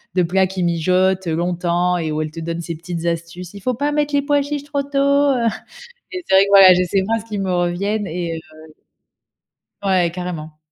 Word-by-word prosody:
de 180 Hz, -, +3 dB
plats 190 Hz, +2 st, +2 dB
qui 190 Hz, -1 st, -3 dB
mijotent 185 Hz, +2 st, +1 dB
longtemps 175 Hz, +1 st, 0 dB
et 160 Hz, -2 st, -2 dB
où 155 Hz, 0 st, -1 dB
elle 155 Hz, 0 st, -4 dB
te 165 Hz, -, -8 dB
donne 165 Hz, +1 st, -4 dB
ses 170 Hz, 0 st, -5 dB
petites 170 Hz, +1 st, -6 dB
astuces: 170 Hz, +2 st, -4 dB
«Il 200 Hz, -, -10 dB
faut 255 Hz, +5 st, -1 dB
pas 285 Hz, +5 st, -1 dB
mettre 295 Hz, 0 st, -1 dB
les 285 Hz, -, +3 dB
pois 290 Hz, 0 st, +2 dB
chiches 285 Hz, 0 st, -4 dB
trop 285 Hz, -1 st, -2 dB
tôt», 280 Hz, 0 st, -12 dB
heu, 280 Hz, -3 st, +3 dB, 0.7 s
et 365 Hz, -1 st, -5 dB
c'est -, -, +1 dB
vrai 195 Hz, -, +7 dB
que -, -, -5 dB
voilà, 195 Hz, -2 st, +9 dB
j'ai 180 Hz, +1 st, +2 dB
ces 190 Hz, +2 st, 0 dB
phrases 225 Hz, +2 st, -1 dB
qui 215 Hz, -2 st, -5 dB
me 190 Hz, -2 st, -1 dB
reviennent 185 Hz, +4 st, -1 dB
et 170 Hz, -1 st, -3 dB
heu 155 Hz, -1 st, -13 dB, 1.1 s
Ouais, 185 Hz, -4 st, +2 dB
carrément. 165 Hz, -4 st, -6 dB
180 Hz, 215 wpm, -19 LUFS, 170-215 Hz, 1.1 s, voilà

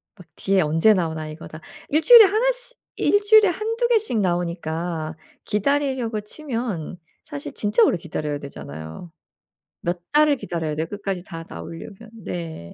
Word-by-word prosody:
막 180 Hz, -4 st, -16 dB
뒤에 195 Hz, -1 st, +1 dB
언제 165 Hz, +8 st, +4 dB
나오나 160 Hz, -4 st, -2 dB
이거 155 Hz, +2 st, -9 dB
다 155 Hz, -, -10 dB, 0.3 s
1 310 Hz, +2 st, +2 dB
주일에 470 Hz, +3 st, +10 dB
1 440 Hz, +6 st, +2 dB
씨 -, -, -8 dB, 0.2 s
1 410 Hz, +1 st, +3 dB
주일에 425 Hz, 0 st, +6 dB
1-2 450 Hz, +6 st, -1 dB
개씩 435 Hz, -, +1 dB
나오니까 170 Hz, -3 st, -2 dB, 0.3 s
기다리려고 250 Hz, -1 st, 0 dB
치면 225 Hz, -, -5 dB, 0.3 s
사실 140 Hz, -1 st, -7 dB
진짜 210 Hz, +2 st, +2 dB
오래 180 Hz, -, +3 dB
기다려야 150 Hz, -3 st, -4 dB
되잖아요. 80 Hz, -, -9 dB, 0.7 s
몇 175 Hz, 0 st, -2 dB
달을 300 Hz, -1 st, +4 dB
기다려야 160 Hz, -7 st, -3 dB
돼요, 160 Hz, +2 st, -2 dB
끝까지 195 Hz, -2 st, -4 dB
다 165 Hz, -3 st, -8 dB
나오려면. 190 Hz, -, -9 dB
네. 165 Hz, -, -7 dB
185 Hz, 295 characters per minute, -23 LUFS, -, 0.7 s, 주일에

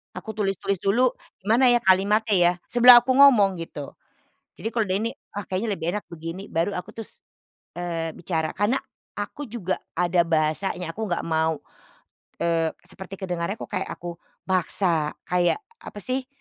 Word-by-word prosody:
Aku 220 Hz, -1 st, -7 dB
tulis-tulis 195 Hz, -2 st, -1 dB
dulu, 235 Hz, +6 st, +4 dB, 0.3 s
"Gimana 235 Hz, +5 st, +4 dB
ya 240 Hz, -, +4 dB
kalimatnya 205 Hz, +1 st, +3 dB
ya? 175 Hz, -1 st, +5 dB, 0.2 s
Sebelum 245 Hz, 0 st, +9 dB
aku 255 Hz, +2 st, 0 dB
ngomong," 235 Hz, -9 st, +6 dB
gitu. 155 Hz, -4 st, -7 dB, 0.6 s
Jadi 225 Hz, -, -4 dB
kalau 225 Hz, -2 st, +1 dB
udah 185 Hz, -, +1 dB
ini, 230 Hz, +1 st, -1 dB, 0.3 s
"Ah 205 Hz, -, -3 dB
kayaknya 190 Hz, +5 st, -2 dB
lebih 160 Hz, -, -5 dB
enak 210 Hz, -, -3 dB
begini." 170 Hz, +4 st, -7 dB
Baru 165 Hz, +5 st, 0 dB
aku 180 Hz, -, -5 dB
terus, 225 Hz, -, -8 dB, 0.6 s
eee, 165 Hz, -2 st, -3 dB
bicara. 160 Hz, -2 st, -2 dB
Karena 205 Hz, +6 st, +1 dB, 0.4 s
aku 265 Hz, +7 st, -5 dB
juga 210 Hz, -5 st, -3 dB, 0.2 s
ada 175 Hz, 0 st, +1 dB
bahasanya, 165 Hz, +2 st, 0 dB
aku 220 Hz, +4 st, -4 dB
enggak 175 Hz, -3 st, -1 dB
mau, 160 Hz, -1 st, 0 dB, 0.8 s
eee, 165 Hz, -1 st, +1 dB
seperti 190 Hz, 0 st, -10 dB
kedengarannya 185 Hz, +1 st, -3 dB
kok -, -, -8 dB
kayak 190 Hz, -2 st, -2 dB
aku 170 Hz, -1 st, -8 dB, 0.2 s
paksa, 175 Hz, -4 st, 0 dB
kayak 180 Hz, -, +1 dB, 0.2 s
apa 205 Hz, -, -10 dB
sih, 255 Hz, +3 st, -2 dB
190 Hz, 155 wpm, -24 LUFS, 170-220 Hz, 0.8 s, Sebelum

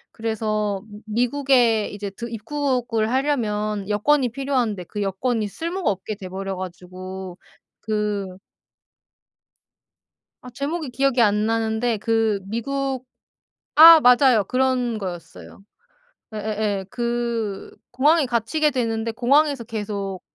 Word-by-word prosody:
그래서 215 Hz, -3 st, -2 dB, 0.2 s
미 220 Hz, +3 st, 0 dB
미국에 245 Hz, -4 st, +2 dB
이제 205 Hz, 0 st, -6 dB
들 235 Hz, +4 st, -8 dB
입국을 235 Hz, -2 st, -1 dB
하려면 215 Hz, -7 st, -1 dB
여권이 250 Hz, +6 st, +2 dB
필요한데 245 Hz, -7 st, -1 dB
그 210 Hz, -, -5 dB
여권이 210 Hz, +3 st, -1 dB
쓸모가 340 Hz, -, -3 dB
없게 195 Hz, +2 st, -5 dB
돼 190 Hz, -2 st, -9 dB
버려 195 Hz, +1 st, -4 dB
가지고 185 Hz, 0 st, -8 dB, 0.4 s
그 210 Hz, -2 st, -2 dB, 2.2 s
아 250 Hz, -, -10 dB
제목이 285 Hz, +5 st, -4 dB
기억이 260 Hz, 0 st, +1 dB
안 210 Hz, -1 st, +3 dB
나는데 225 Hz, +1 st, 0 dB
그 225 Hz, -1 st, +1 dB
미국 265 Hz, +4 st, -3 dB, 0.7 s
아 325 Hz, +1 st, +11 dB
맞아요. 250 Hz, -4 st, +5 dB
그런 255 Hz, -1 st, 0 dB
거였어요. 180 Hz, +1 st, -9 dB, 0.7 s
예예예. 210 Hz, -2 st, -2 dB
그 235 Hz, -3 st, -3 dB, 0.2 s
공항에 295 Hz, +5 st, +3 dB
갇히게 250 Hz, +6 st, 0 dB
되는데 230 Hz, -3 st, -1 dB
공항에서 275 Hz, +3 st, +2 dB
계속 200 Hz, -4 st, -4 dB
225 Hz, 240 characters per minute, -22 LUFS, 205-255 Hz, 2.2 s, 아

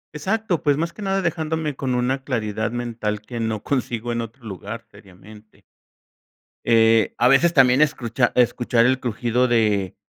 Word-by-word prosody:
Exacto, 190 Hz, +2 st, -1 dB
pues, 145 Hz, -2 st, +2 dB
más 165 Hz, +2 st, -2 dB
que 215 Hz, -, -11 dB
nada 195 Hz, -1 st, -1 dB
dejándome 160 Hz, -3 st, -2 dB
con 130 Hz, -2 st, -2 dB
una 130 Hz, +2 st, -1 dB
claridad 110 Hz, -4 st, -2 dB
mental 115 Hz, -3 st, -3 dB
que 120 Hz, +2 st, -7 dB
no 110 Hz, -2 st, -2 dB
consigo 120 Hz, -3 st, -2 dB
en 115 Hz, 0 st, -2 dB
otro 115 Hz, +2 st, -10 dB
lugar 110 Hz, +3 st, -7 dB
seriamente. 105 Hz, +2 st, -17 dB, 1.0 s
Eh, 115 Hz, -1 st, +4 dB
a 120 Hz, -, +3 dB
veces 165 Hz, +6 st, +4 dB
también 130 Hz, 0 st, +5 dB
escuchar- 125 Hz, -4 st, +1 dB
escuchar 120 Hz, -1 st, +2 dB
el 130 Hz, +1 st, +2 dB
crujido 120 Hz, +1 st, 0 dB
de 105 Hz, -5 st, +1 dB
120 Hz, 155 wpm, -22 LUFS, 110-135 Hz, 1.0 s, también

